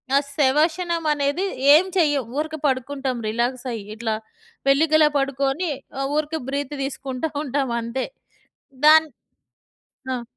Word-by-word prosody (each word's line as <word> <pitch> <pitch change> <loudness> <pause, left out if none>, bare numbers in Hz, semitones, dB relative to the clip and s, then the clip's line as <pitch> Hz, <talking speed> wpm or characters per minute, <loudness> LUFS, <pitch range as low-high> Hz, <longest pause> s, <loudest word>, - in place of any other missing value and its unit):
ఆ - - +7 0.2
శవాషనమనేది 310 +2 +1 0.3
ఏం 335 +5 +6
చెయ్యం. 290 -6 +3
ఊరక 315 +1 -2
పడుకుంటాం 265 0 -2
రిలాక్సయ్యి, 240 -1 -2
ఇట్లా 225 -1 -2 0.5
వెల్లికిలా 310 +2 +5
పడుకొని 275 +4 0 0.3
ఆహ్, 275 - 0
ఊరికే 310 +1 -1
బ్రీత్ 285 +1 -3
దీసుకుంటా 270 +1 -4
ఉంటాం 275 -2 -1
అంతే. 235 +3 -3 0.8
దాన్ 315 +1 +7 1.1
ఆ! 245 -2 -4
280 Hz, 105 wpm, -23 LUFS, 260-310 Hz, 1.1 s, ఆ